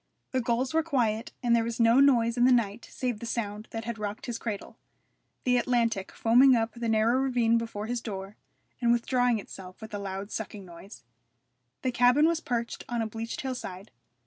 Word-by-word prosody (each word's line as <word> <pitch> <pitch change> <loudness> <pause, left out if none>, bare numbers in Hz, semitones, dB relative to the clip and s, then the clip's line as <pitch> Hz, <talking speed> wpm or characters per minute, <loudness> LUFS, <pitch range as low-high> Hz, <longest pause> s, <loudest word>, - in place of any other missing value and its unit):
The 260 - +1
gulls 245 +3 0
were 320 - +4
quiet, 235 -8 0
and 235 -1 +4
there 230 - +2
was 230 +1 -4
no 230 +2 +5
noise 235 -5 +4
in 245 0 +4
the 255 - +5
night 230 -2 +1
save 245 -4 -3
the 235 - -6
sound 215 -2 -3
that 225 0 -5
had 235 -2 -4
rocked 210 0 -4
his 240 -2 -4
cradle 210 -4 -5 0.7
the 250 -1 +3
Atlantic 230 -5 0
foaming 250 +3 +5
up 225 -1 0
the 235 -1 -3
narrow 225 +3 +3
ravine 240 -4 +2
before 225 -2 -5
his 240 +1 -3
door, 195 -2 -6 0.5
and 235 -1 +3
withdrawing 245 0 +2
itself 185 -2 -10
with 220 -1 -10
a 205 - -3
loud 195 +1 -5
sucking 210 -2 -6
noise. 170 - -12 0.8
The 255 - +1
cabin 250 +5 +4
was 335 -1 +1
perched 235 -7 -3
on 240 -1 -1
a - - -2
bleached 225 +1 -5
hillside. 215 -7 -6
230 Hz, 195 wpm, -28 LUFS, 215-245 Hz, 0.8 s, no